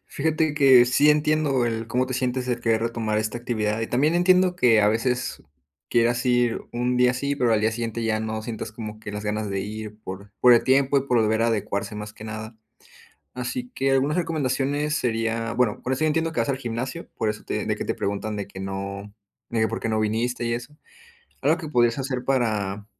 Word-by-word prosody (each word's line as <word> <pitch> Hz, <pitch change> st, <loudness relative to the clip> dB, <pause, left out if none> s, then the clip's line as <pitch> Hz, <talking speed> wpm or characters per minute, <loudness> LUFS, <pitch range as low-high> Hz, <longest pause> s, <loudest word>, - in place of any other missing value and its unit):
Fíjate 155 Hz, 0 st, 0 dB
que 135 Hz, -4 st, +7 dB
sí 145 Hz, +5 st, +4 dB
entiendo 150 Hz, -4 st, +2 dB
el 115 Hz, -1 st, -2 dB
cómo 125 Hz, +2 st, 0 dB
te 130 Hz, -, -4 dB
sientes 125 Hz, 0 st, -1 dB
el 120 Hz, -1 st, -1 dB
querer 115 Hz, -1 st, +1 dB
retomar 115 Hz, -2 st, -1 dB
esta 110 Hz, +2 st, -2 dB
actividad 110 Hz, -2 st, -1 dB
y 115 Hz, -, -1 dB
también 145 Hz, +8 st, +1 dB
entiendo 180 Hz, 0 st, +4 dB
que 115 Hz, -7 st, +5 dB
a 105 Hz, -, +4 dB
veces 125 Hz, +3 st, -1 dB, 0.5 s
quieras 120 Hz, +1 st, +2 dB
ir 120 Hz, -2 st, +2 dB
un 125 Hz, +1 st, 0 dB
día 125 Hz, 0 st, +4 dB
sí, 140 Hz, +2 st, -1 dB
pero 120 Hz, -4 st, +2 dB
al 105 Hz, -, +3 dB
día 110 Hz, +1 st, +1 dB
siguiente 115 Hz, 0 st, -3 dB
ya 110 Hz, -1 st, 0 dB
no 110 Hz, 0 st, -3 dB
sientas 110 Hz, -1 st, -6 dB
como 110 Hz, -1 st, -7 dB
que 105 Hz, -1 st, -7 dB
las 105 Hz, +1 st, -5 dB
ganas 105 Hz, 0 st, -2 dB
de 100 Hz, 0 st, -1 dB
ir, 105 Hz, +1 st, -6 dB
por 100 Hz, +1 st, -8 dB
por 125 Hz, -1 st, +7 dB
el 120 Hz, -, +5 dB
tiempo 135 Hz, +1 st, +3 dB
y 135 Hz, -, -4 dB
por 125 Hz, -3 st, +2 dB
volver 110 Hz, +1 st, +2 dB
a 115 Hz, -, +3 dB
adecuarse 105 Hz, -1 st, -2 dB
más 105 Hz, 0 st, -6 dB
que 110 Hz, -, -11 dB
nada. 110 Hz, +1 st, -7 dB, 0.8 s
Así 125 Hz, -, -4 dB
que 135 Hz, 0 st, +1 dB
algunas 140 Hz, +5 st, +2 dB
recomendaciones 150 Hz, -2 st, 0 dB
sería, 115 Hz, -1 st, -1 dB
bueno, 120 Hz, -3 st, +1 dB
por 130 Hz, -, -3 dB
eso 130 Hz, -, -4 dB
yo 155 Hz, -, +3 dB
entiendo 160 Hz, +1 st, 0 dB
que 120 Hz, -, -2 dB
vas 115 Hz, -, 0 dB
al 135 Hz, -, 0 dB
gimnasio, 125 Hz, +6 st, -5 dB
por 110 Hz, -, 0 dB
eso 105 Hz, -, -5 dB
te -, -, -3 dB
de -, -, 0 dB
que -, -, -5 dB
te -, -, -1 dB
preguntan 100 Hz, +2 st, -3 dB
de 100 Hz, -, -4 dB
que 95 Hz, -1 st, -10 dB
no, 100 Hz, +1 st, -5 dB, 0.4 s
de 115 Hz, -, -1 dB
que: 110 Hz, -, +3 dB
"¿Por 115 Hz, +2 st, -4 dB
qué 115 Hz, -, -2 dB
no 110 Hz, 0 st, +1 dB
viniste?", 115 Hz, +3 st, -1 dB
y 115 Hz, -, 0 dB
eso. 125 Hz, +5 st, -6 dB, 0.7 s
Algo 155 Hz, +4 st, +3 dB
que 160 Hz, -4 st, -7 dB
podrías 120 Hz, -4 st, +3 dB
hacer 130 Hz, -2 st, -3 dB
para 105 Hz, -6 st, 0 dB
120 Hz, 225 wpm, -24 LUFS, 110-135 Hz, 0.8 s, que